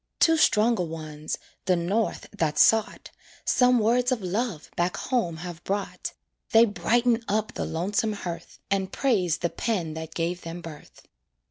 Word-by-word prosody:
Two 325 Hz, -1 st, +5 dB
stronger 230 Hz, -, +3 dB
ones, 155 Hz, -2 st, -5 dB, 0.3 s
the 185 Hz, -, +3 dB
North 195 Hz, +6 st, -1 dB
that 160 Hz, -6 st, 0 dB
sought, 220 Hz, -1 st, +3 dB, 0.3 s
Some 250 Hz, 0 st, +4 dB
words 245 Hz, +3 st, +2 dB
of 235 Hz, -6 st, -1 dB
love 190 Hz, -2 st, -2 dB
back 175 Hz, +1 st, 0 dB
home 185 Hz, -11 st, -1 dB
have 175 Hz, 0 st, -8 dB
brought; 200 Hz, 0 st, -3 dB, 0.4 s
They 225 Hz, +1 st, +8 dB
brighten 235 Hz, +2 st, +1 dB
up 215 Hz, +1 st, 0 dB
the -, -, -3 dB
lonesome 200 Hz, +6 st, -1 dB
hearth, 170 Hz, -4 st, -7 dB
And 190 Hz, -1 st, 0 dB
praise 185 Hz, -, +1 dB
the 170 Hz, -1 st, -2 dB
pen 180 Hz, -9 st, -2 dB
that 160 Hz, 0 st, -7 dB
gave 175 Hz, +1 st, -1 dB
them 165 Hz, +1 st, -6 dB
birth. 160 Hz, -3 st, -11 dB
195 Hz, 150 wpm, -26 LUFS, 170-230 Hz, 0.4 s, They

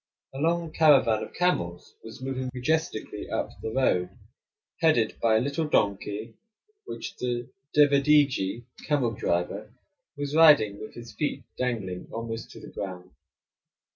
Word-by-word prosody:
A 135 Hz, -, -6 dB
long 165 Hz, +1 st, 0 dB
caravan 135 Hz, -10 st, +5 dB
of -, -, -6 dB
camels 90 Hz, -, -1 dB
was 115 Hz, +3 st, -10 dB
moving 130 Hz, -1 st, -3 dB
majestically 125 Hz, -6 st, -2 dB
up -, -, -2 dB
the -, -, -3 dB
road, 100 Hz, -8 st, +1 dB, 0.7 s
headed 155 Hz, -9 st, +3 dB
by 115 Hz, -1 st, +4 dB
a -, -, +5 dB
little 140 Hz, +6 st, -1 dB
donkey, 105 Hz, -2 st, 0 dB, 0.5 s
which -, -, -7 dB
the 120 Hz, -1 st, -3 dB, 0.3 s
devedejee 140 Hz, -6 st, +4 dB, 0.2 s
(camel 140 Hz, -6 st, +2 dB
driver) 90 Hz, -5 st, -2 dB, 0.5 s
was 145 Hz, 0 st, -3 dB
riding 145 Hz, -11 st, +6 dB
with 110 Hz, -, -9 dB
his 120 Hz, -1 st, -10 dB
feet 145 Hz, -3 st, -2 dB
dangling 105 Hz, -8 st, -3 dB
almost 115 Hz, 0 st, -5 dB
to -, -, -11 dB
the -, -, -12 dB
ground. 90 Hz, -2 st, -6 dB
120 Hz, 135 wpm, -27 LUFS, 110-145 Hz, 0.7 s, riding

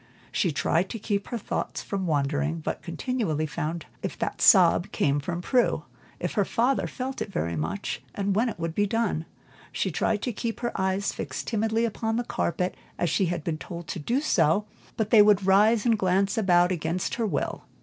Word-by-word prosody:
She 175 Hz, -, +1 dB
tried 165 Hz, +5 st, +1 dB
to -, -, -4 dB
keep 205 Hz, -2 st, -2 dB
her 240 Hz, -, -3 dB
thoughts 220 Hz, -, -3 dB
from 195 Hz, -2 st, -3 dB
wandering, 150 Hz, +1 st, 0 dB
but -, -, -3 dB
continually 170 Hz, -, -2 dB
found 160 Hz, +1 st, -3 dB
herself -, -, -24 dB
wondering -, -, -31 dB
if -, -, -17 dB
that -, -, -3 dB
sob -, -, +6 dB
came 140 Hz, 0 st, +1 dB
from 170 Hz, +4 st, -4 dB
Prue, 250 Hz, +3 st, +2 dB, 0.3 s
if -, -, -3 dB
her 205 Hz, -, +2 dB
father 245 Hz, +7 st, +1 dB
felt 265 Hz, +1 st, -5 dB
it 200 Hz, -, -3 dB
very 85 Hz, -, -2 dB
much, 80 Hz, +6 st, -3 dB
and 200 Hz, -1 st, 0 dB
when 235 Hz, +4 st, +2 dB
it -, -, -6 dB
would 165 Hz, 0 st, -2 dB
be 205 Hz, +4 st, +1 dB
done. 210 Hz, -7 st, 0 dB, 0.5 s
She -, -, -1 dB
tried 210 Hz, -2 st, 0 dB
to 245 Hz, -, -1 dB
keep 230 Hz, +2 st, -4 dB
her 240 Hz, -, -1 dB
eyes 190 Hz, +1 st, 0 dB
fixed -, -, -5 dB
timidly 225 Hz, +1 st, +1 dB
upon 225 Hz, 0 st, -2 dB
the 240 Hz, -, 0 dB
carpet 180 Hz, -4 st, -1 dB, 0.2 s
as 175 Hz, -, 0 dB
she 190 Hz, +1 st, +2 dB
had 170 Hz, -2 st, -2 dB
been 155 Hz, -1 st, -2 dB
told 170 Hz, -1 st, -7 dB
to 175 Hz, -, -3 dB
do, 245 Hz, -, 0 dB, 0.7 s
but 220 Hz, -1 st, -1 dB
they 220 Hz, -, +8 dB
would 205 Hz, -2 st, +5 dB
rise 210 Hz, +4 st, +4 dB
and 230 Hz, -3 st, +3 dB
glance 195 Hz, +2 st, +2 dB
about 180 Hz, -5 st, +4 dB
against 175 Hz, +1 st, -2 dB
her 230 Hz, -2 st, 0 dB
will. -, -, -2 dB
195 Hz, 200 wpm, -26 LUFS, 165-225 Hz, 0.7 s, they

